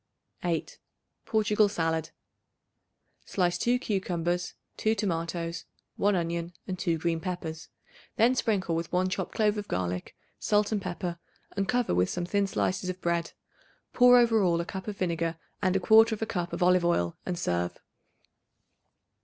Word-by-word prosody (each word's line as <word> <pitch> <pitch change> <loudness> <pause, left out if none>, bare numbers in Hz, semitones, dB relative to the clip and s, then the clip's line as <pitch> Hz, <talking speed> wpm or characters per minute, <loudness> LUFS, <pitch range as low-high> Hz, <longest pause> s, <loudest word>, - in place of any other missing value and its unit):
8. 170 -2 -2 0.5
Portugal 215 -1 +3
Salad. 160 -4 -1 1.1
Slice 175 -2 0
2 240 +5 +2
cucumbers, 180 -6 -2 0.2
2 220 +1 +1
tomatoes, 170 -3 -2 0.3
1 205 0 +3
onion 170 0 -2
and 185 -1 -4
two 170 -2 +1
green 165 +1 -1
peppers. 160 -3 -5 0.5
Then 235 +3 +4
sprinkle 200 -9 0
with 165 0 -3
1 185 +1 +1
chopped 190 0 -3
clove 210 -1 +2
of 205 - -6
garlic, 90 0 -3 0.2
salt 210 0 +2
and 210 -2 0
pepper 175 -1 -4 0.4
and 195 -1 0
cover 245 -1 +1
with 90 +1 +2
some 175 0 -2
thin 200 +2 +1
slices 185 -1 -1
of 185 0 -4
bread. 170 -1 -1 0.6
Pour 245 0 +7
over 230 -3 +4
all 170 -3 +2
a 170 - -2
cup 190 +3 -6
of 205 -2 -4
vinegar 170 -2 -1 0.2
and 185 -2 +2
1/4 220 +3 +5
cup 175 -4 -3
of - - -1
olive 180 0 +4
oil 85 - +1
and 180 -1 -3
serve. 90 - -1
180 Hz, 150 wpm, -28 LUFS, 170-205 Hz, 1.1 s, Pour